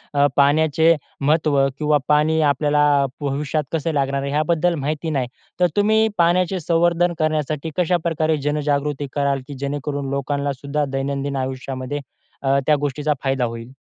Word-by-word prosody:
अ, 140 Hz, -, +4 dB
पाण्याचे 160 Hz, +3 st, +4 dB, 0.3 s
महत्व 150 Hz, -1 st, +2 dB, 0.2 s
किंवा 150 Hz, -1 st, +2 dB
पाणी 150 Hz, +2 st, +3 dB
आपल्याला 145 Hz, +1 st, +1 dB, 0.2 s
अ, -, -, +2 dB, 0.2 s
भविष्यात 145 Hz, +2 st, -1 dB
कसे 165 Hz, 0 st, -1 dB
लागणार 140 Hz, -1 st, 0 dB
आहे 140 Hz, 0 st, -3 dB
ह्याबद्दल 165 Hz, +3 st, +1 dB
माहिती 155 Hz, +2 st, -3 dB
नाही. 135 Hz, -5 st, -1 dB, 0.3 s
तर 180 Hz, -, +5 dB
तुम्ही 220 Hz, +2 st, +3 dB
पाण्याचे 180 Hz, +2 st, +2 dB
संवर्धन 175 Hz, +2 st, +2 dB
करण्यासाठी 155 Hz, 0 st, -1 dB
कशाप्रकारे 165 Hz, -3 st, +1 dB
जनजागृती 145 Hz, 0 st, -1 dB
कराल, 140 Hz, -1 st, +1 dB, 0.2 s
की 145 Hz, -, -7 dB
जेणेकरून 140 Hz, 0 st, -3 dB
लोकांनासुद्धा 140 Hz, +1 st, -2 dB
दैनंदिन 140 Hz, +1 st, -2 dB
आयुष्यामध्ये 130 Hz, +1 st, -4 dB, 0.5 s
अ, 135 Hz, +1 st, +3 dB
त्या 155 Hz, -, +5 dB
गोष्टीचा 145 Hz, +1 st, -1 dB
फायदा 135 Hz, -2 st, +1 dB
होईल? 115 Hz, +2 st, -7 dB
145 Hz, 140 wpm, -21 LUFS, 140-160 Hz, 0.5 s, तर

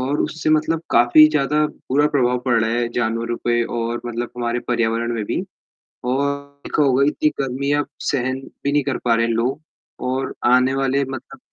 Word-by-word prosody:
और 135 Hz, +3 st, -1 dB
उससे 155 Hz, 0 st, -2 dB
मतलब 155 Hz, +1 st, +2 dB
काफ़ी 120 Hz, +6 st, +7 dB
ज़्यादा 150 Hz, 0 st, +1 dB
बुरा 145 Hz, +1 st, 0 dB
प्रभाव 125 Hz, -2 st, +2 dB
पड़ 125 Hz, -, +3 dB
रहा 110 Hz, -, 0 dB
है 120 Hz, 0 st, 0 dB
जानवरों 115 Hz, 0 st, -1 dB
पे 120 Hz, 0 st, +2 dB
और 115 Hz, +1 st, -3 dB
मतलब 120 Hz, 0 st, -4 dB
हमारे 120 Hz, 0 st, -1 dB
पर्यावरण 115 Hz, 0 st, 0 dB
में 110 Hz, -2 st, -2 dB
भी -, -, -2 dB, 0.7 s
और 135 Hz, +2 st, +1 dB, 0.4 s
देखा 150 Hz, -, +1 dB
होगा 135 Hz, 0 st, +3 dB
ही 145 Hz, -, +4 dB
इतनी 150 Hz, -, +1 dB
गर्मी 135 Hz, +2 st, -2 dB
अब 145 Hz, -, -2 dB, 0.2 s
सहन 130 Hz, -1 st, -1 dB, 0.3 s
भी 140 Hz, -, +2 dB
नहीं 145 Hz, 0 st, +2 dB
कर 140 Hz, -1 st, -1 dB
पा 115 Hz, -, +4 dB
रहे 115 Hz, 0 st, +2 dB
हैं 115 Hz, -, 0 dB
लोग 125 Hz, +6 st, -1 dB, 0.5 s
और 130 Hz, 0 st, -2 dB, 0.2 s
आने 125 Hz, +1 st, +4 dB
वाले 135 Hz, +1 st, +1 dB
मतलब 135 Hz, 0 st, -8 dB
130 Hz, 195 wpm, -21 LUFS, 120-140 Hz, 0.7 s, काफ़ी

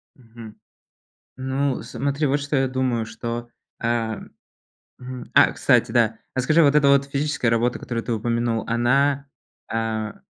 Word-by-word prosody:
Мгм. 115 Hz, -3 st, -13 dB, 0.8 s
Ну 130 Hz, 0 st, -1 dB
смотри 140 Hz, +5 st, -2 dB
вот 140 Hz, +1 st, +1 dB
что 145 Hz, +1 st, -2 dB
я 135 Hz, -1 st, +2 dB
думаю 130 Hz, -3 st, -1 dB
что, 115 Hz, +2 st, -5 dB, 0.3 s
э, -, -, -3 dB, 1.1 s
м, 125 Hz, -1 st, -8 dB
а -, -, +6 dB
кстати, -, -, +2 dB
да, 115 Hz, -2 st, +2 dB, 0.2 s
а 130 Hz, -, 0 dB
скажи 155 Hz, +6 st, +4 dB
вот 145 Hz, 0 st, +4 dB
эта 145 Hz, -2 st, +5 dB
вот 140 Hz, 0 st, +5 dB
физическая 140 Hz, -3 st, -1 dB
работа, 120 Hz, +1 st, +1 dB
которую 115 Hz, -2 st, -4 dB
ты -, -, -4 dB
упомянул, 115 Hz, 0 st, -1 dB
она, 140 Hz, +4 st, +2 dB, 0.4 s
а, 110 Hz, -1 st, -2 dB
125 Hz, 145 wpm, -23 LUFS, 115-140 Hz, 1.1 s, а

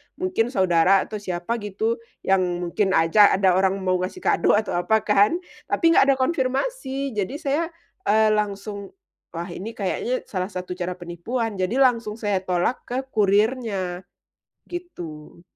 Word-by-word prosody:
mungkin 365 Hz, -11 st, 0 dB
saudara 185 Hz, 0 st, +4 dB
atau 215 Hz, -, -6 dB
siapa 185 Hz, +4 st, -3 dB
gitu, 220 Hz, +3 st, -2 dB, 0.2 s
yang 195 Hz, 0 st, +3 dB, 0.2 s
mungkin 190 Hz, +2 st, 0 dB
aja 195 Hz, +6 st, +5 dB
ada 190 Hz, -1 st, +3 dB
orang 190 Hz, 0 st, +2 dB
mau 185 Hz, -1 st, +1 dB
ngasih 185 Hz, -, -5 dB
kado 420 Hz, -, +3 dB
atau 215 Hz, +1 st, 0 dB
apa 220 Hz, +3 st, +2 dB
kan 210 Hz, +8 st, +4 dB, 0.3 s
tapi 330 Hz, -1 st, +3 dB
nggak 330 Hz, -, +6 dB
ada 275 Hz, -, +5 dB
konfirmasi. 270 Hz, -, -1 dB
Jadi 205 Hz, +7 st, -1 dB
saya, 305 Hz, +3 st, 0 dB, 0.4 s
eee, 215 Hz, +1 st, +4 dB
langsung, 205 Hz, -, -3 dB, 0.4 s
wah, 170 Hz, +2 st, -4 dB
ini 220 Hz, +6 st, -7 dB
kayaknya 230 Hz, +5 st, -2 dB
salah 185 Hz, -2 st, -2 dB
satu 180 Hz, -2 st, -7 dB
cara 180 Hz, 0 st, -3 dB
penipuan 190 Hz, +5 st, -4 dB
jadi 185 Hz, +6 st, 0 dB
langsung 230 Hz, -4 st, +2 dB
saya 205 Hz, -4 st, -1 dB
tolak 180 Hz, +5 st, 0 dB
ke 245 Hz, -, -3 dB
kurirnya, 200 Hz, -3 st, +1 dB, 0.6 s
gitu. 170 Hz, -, -8 dB
205 Hz, 145 wpm, -23 LUFS, 185-245 Hz, 0.6 s, nggak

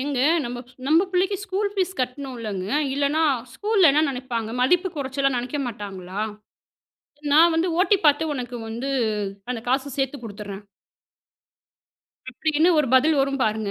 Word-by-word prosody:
"ஏங்க 275 Hz, -1 st, -2 dB, 0.3 s
நம்ப 240 Hz, +1 st, -5 dB, 0.3 s
நம்ப 320 Hz, +4 st, +5 dB
பிள்ளைக்கு 380 Hz, +2 st, +1 dB
ஸ்கூல் 400 Hz, +1 st, -1 dB
ஃபீஸ் 375 Hz, -1 st, -1 dB
கட்ணுலங்க! 245 Hz, -7 st, -4 dB, 0.3 s
இல்லைன்னா, 285 Hz, +3 st, +1 dB, 0.3 s
ஸ்கூல்ல 410 Hz, -6 st, +4 dB
என்ன 300 Hz, -, +3 dB
நினைப்பாங்க? 245 Hz, -4 st, -4 dB
மதிப்பு 360 Hz, +7 st, +3 dB
குறைச்சலா 275 Hz, 0 st, 0 dB
நினைக்க 250 Hz, +4 st, -3 dB
மாட்டாங்களா?" 200 Hz, -4 st, -6 dB, 1.1 s
"நான் 330 Hz, +2 st, +6 dB
வந்து 340 Hz, +3 st, +1 dB
ஓ.டி 400 Hz, +2 st, +4 dB
பாத்து 295 Hz, +1 st, +3 dB
உனக்கு 245 Hz, -2 st, -5 dB
வந்து 235 Hz, +5 st, -4 dB, 0.6 s
அந்த 230 Hz, -3 st, -4 dB
காச 270 Hz, +2 st, 0 dB
சேத்து 270 Hz, +1 st, -1 dB
கொடுத்தர்றேன்" 205 Hz, -2 st, -8 dB, 1.7 s
அப்படின்னு 315 Hz, +5 st, +1 dB
ஒரு 300 Hz, -, +3 dB
பதில் 290 Hz, +3 st, +4 dB
வரும் 275 Hz, 0 st, 0 dB
பாருங்க. 215 Hz, -1 st, 0 dB
275 Hz, 130 wpm, -23 LUFS, 240-320 Hz, 1.7 s, நான்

